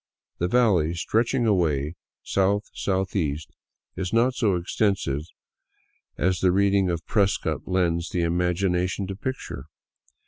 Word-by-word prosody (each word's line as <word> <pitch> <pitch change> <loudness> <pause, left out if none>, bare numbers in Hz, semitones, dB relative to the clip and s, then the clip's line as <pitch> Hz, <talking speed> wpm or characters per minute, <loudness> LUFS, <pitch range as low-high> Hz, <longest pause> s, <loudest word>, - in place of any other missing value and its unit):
The 90 - +1
valley, 90 -8 +3
stretching 115 +7 +1
away 80 -8 +1 0.3
south 100 +2 +1
southeast, 95 -6 -1 0.4
is 95 -1 -3
not 120 +3 +3
so 110 -7 +1
extensive 90 -5 0 1.0
as 90 +1 +1
the 90 0 +3
reading 100 0 +3
of 85 -2 -3
Prescott 100 -2 0
leads 85 -2 0
the 90 - -1
imagination 90 +2 0
to 95 +1 -5
picture. 130 +6 -5
95 Hz, 115 wpm, -25 LUFS, 85-100 Hz, 1.0 s, valley